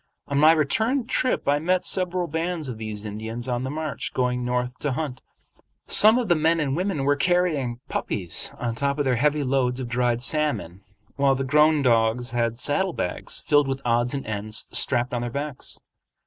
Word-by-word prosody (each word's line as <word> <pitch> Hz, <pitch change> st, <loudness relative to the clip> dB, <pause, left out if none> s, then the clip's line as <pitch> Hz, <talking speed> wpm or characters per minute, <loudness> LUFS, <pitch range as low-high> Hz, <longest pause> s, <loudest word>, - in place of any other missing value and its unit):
On 140 Hz, 0 st, 0 dB
my 155 Hz, +2 st, +7 dB
return 220 Hz, -, +1 dB
trip 255 Hz, +1 st, -1 dB
I 145 Hz, +1 st, +3 dB
met 180 Hz, +3 st, 0 dB
several 180 Hz, -1 st, 0 dB
bands 165 Hz, 0 st, -3 dB
of 120 Hz, -4 st, -6 dB
these 110 Hz, -1 st, -5 dB
Indians 110 Hz, +3 st, -5 dB
on 125 Hz, 0 st, -1 dB
the 130 Hz, -, -3 dB
march, 155 Hz, 0 st, -4 dB
going 125 Hz, -1 st, 0 dB
north 125 Hz, 0 st, -2 dB
to 145 Hz, -3 st, -1 dB
hunt. 130 Hz, -2 st, -4 dB, 0.6 s
Some 220 Hz, +3 st, +6 dB
of 245 Hz, -3 st, -1 dB
the 175 Hz, -, +4 dB
men 165 Hz, +2 st, +2 dB
and 140 Hz, -3 st, 0 dB
women 180 Hz, -4 st, -1 dB
were 145 Hz, +1 st, +3 dB
carrying 150 Hz, -8 st, 0 dB
puppies 90 Hz, -6 st, -3 dB
on 120 Hz, -1 st, -2 dB
top 140 Hz, +4 st, -1 dB
of 145 Hz, -, 0 dB
their 125 Hz, -2 st, +2 dB
heavy 150 Hz, +3 st, +1 dB
loads 130 Hz, -1 st, 0 dB
of 130 Hz, -, -4 dB
dried 120 Hz, 0 st, 0 dB
salmon, 125 Hz, -, -1 dB, 0.4 s
while 140 Hz, -1 st, +3 dB
the 135 Hz, -, -2 dB
grown 150 Hz, +2 st, +3 dB
dogs 115 Hz, 0 st, +2 dB
had 115 Hz, -1 st, -1 dB
saddle 175 Hz, +8 st, 0 dB
bags 90 Hz, -, -3 dB
filled 145 Hz, -1 st, +3 dB
with 135 Hz, 0 st, -2 dB
odds 120 Hz, +2 st, +1 dB
and 135 Hz, -, -4 dB
ends 110 Hz, 0 st, -2 dB
strapped 125 Hz, 0 st, +2 dB
on 120 Hz, -, -1 dB
their 120 Hz, -, -3 dB
backs. 140 Hz, +2 st, -5 dB
135 Hz, 190 wpm, -24 LUFS, 120-155 Hz, 0.6 s, my